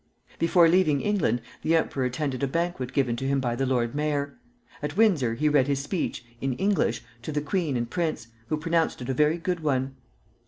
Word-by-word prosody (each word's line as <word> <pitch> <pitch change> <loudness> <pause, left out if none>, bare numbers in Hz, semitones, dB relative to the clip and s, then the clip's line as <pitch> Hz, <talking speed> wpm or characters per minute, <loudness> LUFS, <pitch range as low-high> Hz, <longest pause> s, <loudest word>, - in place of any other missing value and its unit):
Before 170 0 +5
leaving 165 -5 +3
England 180 - +1 0.2
the 165 - +2
emperor 140 -5 0
attended 130 +1 -2
a 140 - +1
banquet 165 -4 -2
given 130 -4 +1
to 135 - -3
him 140 0 +2
by 120 -3 -1
the 135 +2 -1
Lord 120 -3 0
Mayor. 145 -1 -1 0.5
At 150 +5 -4
Windsor 160 - +3
he 150 +6 +1
read 145 -3 +3
his 140 -1 +1
speech 150 -7 -3 0.2
(in 135 -1 0
English) 125 - 0 0.2
to 155 - -5
the 150 - 0
queen 150 -2 -1
and 120 0 -2
prince, 155 -4 -2 0.2
who 155 - 0
pronounced 165 -4 0
it 125 - -7
a - - +1
very 150 +5 +3
good 175 +1 -2
one. 135 -3 -1
145 Hz, 200 wpm, -26 LUFS, 130-165 Hz, 0.5 s, Before